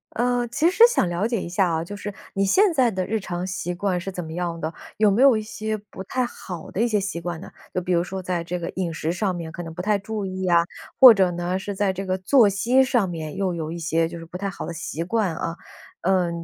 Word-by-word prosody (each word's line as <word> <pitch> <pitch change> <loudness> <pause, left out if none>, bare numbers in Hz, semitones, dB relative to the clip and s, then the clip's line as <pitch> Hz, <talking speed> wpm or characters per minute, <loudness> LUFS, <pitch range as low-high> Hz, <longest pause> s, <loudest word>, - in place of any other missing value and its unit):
呃， 245 +1 +1
其 320 +8 +2
实 405 +5 +5
想 180 - +2
了 175 +4 -1
解 230 -3 0
一 - - -5
下 180 +1 +1
啊， 160 -1 -1
就 205 +5 -7
是 205 0 -6 0.2
你 195 - +1
现 380 - +4
在 255 -6 +3
的 185 -2 -2
日 220 +4 -1
常 180 -2 -4
习 180 -1 -3
惯 180 0 -1
是 195 +2 -5
怎 180 -1 -5
么 160 - -7
样 170 -1 -3
的？ 160 +1 -3 0.2
有 215 -1 +5
没 200 +5 +2
有 270 -4 +7
一 - - -2
些 215 0 -4
不 205 -2 -10
太 255 +6 -1
好 180 -8 -8
的 200 - -2
一 235 - +3
些 215 -3 +1
习 195 -3 -4
惯 175 -1 -4
呢？ - - -10 0.2
就 185 - 0
比 180 +1 -1
如 170 0 +3
说 190 +1 -5
在 180 -2 -2
这 175 +1 -4
个 170 - -4
饮 180 -3 -3
食 160 0 -2
上 190 0 0
面 170 -2 -5
可 175 - -6
能 165 -1 -8
不 180 - -5
太 210 +2 +2
注 210 +1 -4
意 185 0 -4
啊， 170 -1 +5 0.4
或 255 -3 +11
者 190 -4 +2
呢， 175 +1 -2
是 200 +1 -4
在 195 -1 0
这 195 +1 -5
个 185 0 0
作 210 +4 +5
息 240 +7 +3
上 245 -6 +2
面 160 -3 -5
又 190 -2 0
有 160 -2 -4
一 170 - -5
些 165 0 +1
就 170 0 -7
是 165 - -9
不 175 +2 -8
太 200 +1 -3
好 185 - -6
的 170 - -5
习 165 0 -5
惯 200 -1 0
啊。 165 0 -3 0.5
呃， 185 -1 +2
185 Hz, 295 characters per minute, -24 LUFS, 175-210 Hz, 0.5 s, 或